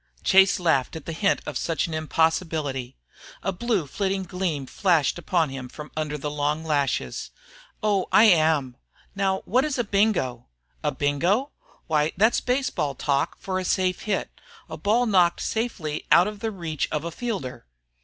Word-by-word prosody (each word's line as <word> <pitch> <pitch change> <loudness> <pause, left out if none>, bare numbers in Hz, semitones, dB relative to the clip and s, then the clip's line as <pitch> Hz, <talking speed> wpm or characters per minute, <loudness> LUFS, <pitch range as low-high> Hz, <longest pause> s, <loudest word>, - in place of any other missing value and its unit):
Chase 190 0 +5
laughed 160 -7 +1
at 160 - -7
the - - -4
hint 195 +5 +1
of - - -3
such 165 - -1
an 165 - -6
impossibility. 155 - -1 0.5
A 195 - 0
blue 200 -2 -1
flitting 195 +6 -2
gleam 180 -6 -3
flashed 170 +1 +1
upon 170 -2 +1
him 130 -2 -7
from 150 +3 -10
under 155 -1 -2
the 150 +1 -4
long 150 +2 -1
lashes. 145 -3 -1 0.5
"Oh, 200 -3 +1
I - - +7
am. 155 - +3 0.4
Now 195 -1 0
what 255 +5 +2
is 300 -3 -1
a 245 - +1
bingo?" 195 - 0 0.4
"A - - +1
bingo? 175 - 0 0.3
Why 155 -1 +1
that's 220 +5 +3
baseball 245 - -1
talk 140 +1 0
for 185 -1 -3
a - - -3
safe 185 0 0
hit, 205 -3 -2 0.4
a - - -6
ball 230 +4 +2
knocked 180 -6 +3
safely 195 -10 -3
out 175 - +7
of 210 -1 -6
the 225 - -2
reach 170 -7 -3
of 150 - -1
a 170 - -3
fielder." 180 - -5
170 Hz, 165 wpm, -25 LUFS, 150-200 Hz, 0.5 s, I